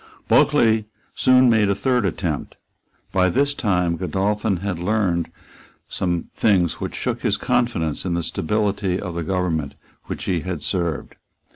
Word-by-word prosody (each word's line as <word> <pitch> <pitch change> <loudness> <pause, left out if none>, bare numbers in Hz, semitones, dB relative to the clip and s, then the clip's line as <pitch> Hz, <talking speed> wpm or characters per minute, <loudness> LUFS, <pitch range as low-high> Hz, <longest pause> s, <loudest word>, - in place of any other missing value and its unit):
Bulkeley 110 -2 +4 0.3
soon 130 0 +5
made 110 -4 +4
a 100 - +2
third 125 0 +1
attempt. 85 -5 -3 0.6
By 95 -1 +3
this 140 +9 +1
time 90 -9 0
Godolphin 100 +2 0
had 95 -1 -3
learned 90 -3 0 0.6
some 85 -3 -2
things 90 -6 +2
which - - -4
shook - - -2
his - - +1
confidence 85 -11 0
in 90 -2 -1
the 85 - -1
stability 100 +1 -1
of 90 -4 -5
the 85 - -3
government 80 -5 -1 0.3
which - - -5
he 90 -3 0 0.2
served. 85 -4 -3
95 Hz, 140 wpm, -22 LUFS, 85-105 Hz, 0.6 s, soon